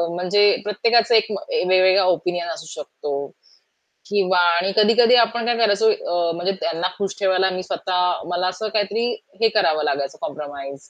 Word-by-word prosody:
म्हणजे 205 Hz, +3 st, +3 dB
प्रत्येकाचं 230 Hz, +3 st, +2 dB
एक 220 Hz, 0 st, +2 dB
ए 200 Hz, -, -3 dB
वेगवेगळा 185 Hz, +1 st, +4 dB
ओपिनियन 175 Hz, 0 st, -4 dB
असू 160 Hz, -, -10 dB, 0.2 s
शकतो. 140 Hz, -1 st, -6 dB, 0.8 s
किंवा 190 Hz, -3 st, +1 dB
आणि 175 Hz, +3 st, +1 dB
कधी-कधी 230 Hz, +3 st, +5 dB
आपण 230 Hz, +1 st, -1 dB
काय 240 Hz, 0 st, +1 dB
करायचं 220 Hz, -1 st, +3 dB
अ, 175 Hz, -4 st, -2 dB
म्हणजे 175 Hz, +3 st, -1 dB
त्यांना 170 Hz, +2 st, -1 dB
खुश 200 Hz, 0 st, -3 dB
ठेवायला 190 Hz, -1 st, +2 dB
मी 185 Hz, 0 st, -4 dB
स्वतः 180 Hz, -1 st, -1 dB
मला 180 Hz, +1 st, -1 dB
असं 185 Hz, +4 st, -4 dB
काहीतरी 210 Hz, +2 st, 0 dB, 0.4 s
हे 225 Hz, -, +5 dB
करावं 160 Hz, -7 st, +2 dB
लागायचं 140 Hz, -2 st, -2 dB
कॉम्प्रोमाईज 140 Hz, -2 st, -8 dB
185 Hz, 155 wpm, -21 LUFS, 175-210 Hz, 0.8 s, कधी-कधी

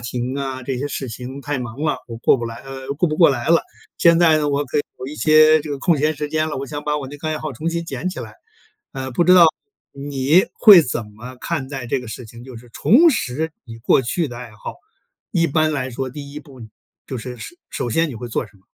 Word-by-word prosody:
庭 120 Hz, +2 st, -4 dB
啊， 135 Hz, -2 st, -4 dB
这 130 Hz, 0 st, -3 dB
些 140 Hz, -, -2 dB
事 135 Hz, -2 st, -5 dB
情 125 Hz, +4 st, -7 dB
太 145 Hz, 0 st, -3 dB
忙 120 Hz, +2 st, -7 dB
了， 150 Hz, -, 0 dB
我 115 Hz, -, -7 dB
过 125 Hz, -, +4 dB
不 120 Hz, -, -5 dB
来 115 Hz, 0 st, -7 dB
呃， 135 Hz, 0 st, -8 dB
顾 170 Hz, +2 st, +2 dB
不 155 Hz, -, -2 dB
过 170 Hz, -1 st, +7 dB
来 120 Hz, +1 st, -3 dB
了。 170 Hz, -, +5 dB, 0.4 s
现 170 Hz, -1 st, +5 dB
在 165 Hz, -3 st, +5 dB
呢， 150 Hz, -1 st, 0 dB
我 145 Hz, 0 st, 0 dB
可 145 Hz, +2 st, -2 dB
以 -, -, +1 dB, 0.2 s
有 130 Hz, -, -5 dB
一 150 Hz, -, -7 dB
些 155 Hz, 0 st, +5 dB
这 150 Hz, 0 st, -7 dB
个 140 Hz, -, -3 dB
空 165 Hz, -4 st, +2 dB
闲 155 Hz, +2 st, +1 dB
时 150 Hz, 0 st, -4 dB
间 155 Hz, +1 st, 0 dB
了， 150 Hz, -, -4 dB
我 135 Hz, -, -4 dB
想 145 Hz, +1 st, -6 dB
把 150 Hz, 0 st, 0 dB
我 135 Hz, -3 st, -5 dB
那 145 Hz, -, -9 dB
个 155 Hz, -, -4 dB
爱 155 Hz, -, -1 dB
好 155 Hz, -2 st, -5 dB
重 155 Hz, +7 st, -4 dB
新 170 Hz, 0 st, -2 dB
捡 150 Hz, +3 st, -4 dB
起 180 Hz, -, -6 dB
来。 110 Hz, -3 st, -8 dB, 0.6 s
呃， 130 Hz, 0 st, -5 dB
不 150 Hz, +7 st, +1 dB
知 180 Hz, +2 st, +6 dB
道 175 Hz, -2 st, +9 dB, 0.5 s
你 140 Hz, +4 st, +2 dB
会 205 Hz, -6 st, +9 dB
怎 125 Hz, -6 st, -3 dB
么 125 Hz, +4 st, -10 dB
看 155 Hz, -6 st, -3 dB
待 135 Hz, -3 st, -6 dB
这 125 Hz, -, -1 dB
个 125 Hz, -, -10 dB
事 125 Hz, -, -7 dB
情？ 115 Hz, +2 st, -12 dB
就 130 Hz, -2 st, -10 dB
是 120 Hz, +1 st, -14 dB
重 320 Hz, -, +5 dB
拾 160 Hz, -, -2 dB
你 115 Hz, -2 st, -10 dB
过 115 Hz, -, +3 dB
去 150 Hz, +7 st, -1 dB
的 120 Hz, -, -8 dB
爱 120 Hz, -1 st, -9 dB
好， 105 Hz, -, -8 dB, 0.6 s
一 165 Hz, -1 st, +2 dB
般 155 Hz, 0 st, +1 dB
来 130 Hz, -2 st, -2 dB
说 130 Hz, +2 st, -4 dB
第 140 Hz, +1 st, -9 dB
一 150 Hz, -, -7 dB
步 135 Hz, -4 st, -15 dB, 0.5 s
就 130 Hz, -, -5 dB
是， 125 Hz, +1 st, -7 dB
首 335 Hz, -, -10 dB
首 120 Hz, -, -3 dB
先 165 Hz, +7 st, +1 dB
你 135 Hz, -, -7 dB
会 120 Hz, +2 st, -7 dB
做 120 Hz, -, -2 dB
什 105 Hz, -1 st, -22 dB
么？ 95 Hz, -, -28 dB
140 Hz, 285 characters per minute, -20 LUFS, 125-155 Hz, 0.6 s, 道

